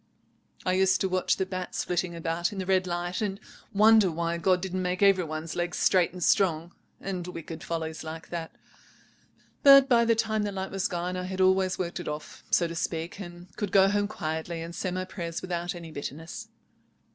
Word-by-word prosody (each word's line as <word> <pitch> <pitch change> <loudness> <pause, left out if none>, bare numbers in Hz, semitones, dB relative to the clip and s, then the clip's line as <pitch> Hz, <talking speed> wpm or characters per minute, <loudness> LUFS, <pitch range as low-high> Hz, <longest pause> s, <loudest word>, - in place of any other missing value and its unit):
I 185 - +2
used 190 0 +3
to 190 - +2
watch 185 0 +1
the 190 - 0
bats 185 -1 -4
flitting 175 -1 -1
about 165 +1 -1
in 205 - -7
the 190 - -3
red 185 0 +2
light, 175 +2 -2
and 200 -2 -2 0.3
wonder 215 -1 +6
why 170 +1 -2
God 180 +1 +3
didn't 185 0 -3
make 180 +2 0
every 195 -3 +5
one's 155 +1 -5
legs 175 0 -2
straight 180 -2 +3
and 180 0 -5
strong, 170 -4 +2 0.3
and 185 -3 -4
wicked 165 -2 -7
follies 160 -1 -4
like 160 0 -8
that. 165 -2 -5 1.1
But 275 -1 +9
by 235 -3 +4
the 230 0 +4
time 220 -1 0
the 205 -1 -1
light 190 0 -4
was 195 0 0
gone 180 +1 -3
I 180 0 -3
had 190 0 -5
always 185 0 +3
worked 180 0 -3
it 175 - -6
off, 150 0 -6
so 170 - +3
to 165 - -6
speak, 165 +2 -3
and 175 -1 -10
could 205 -3 -2
go 195 0 +6
home 205 0 +1
quietly 160 -2 -4
and 170 +1 -7
say 185 - -2
my 185 +1 -3
prayers 170 -3 -5
without 175 -1 -3
any 170 -2 -8
bitterness. 155 +2 -7
180 Hz, 205 wpm, -28 LUFS, 170-190 Hz, 1.1 s, But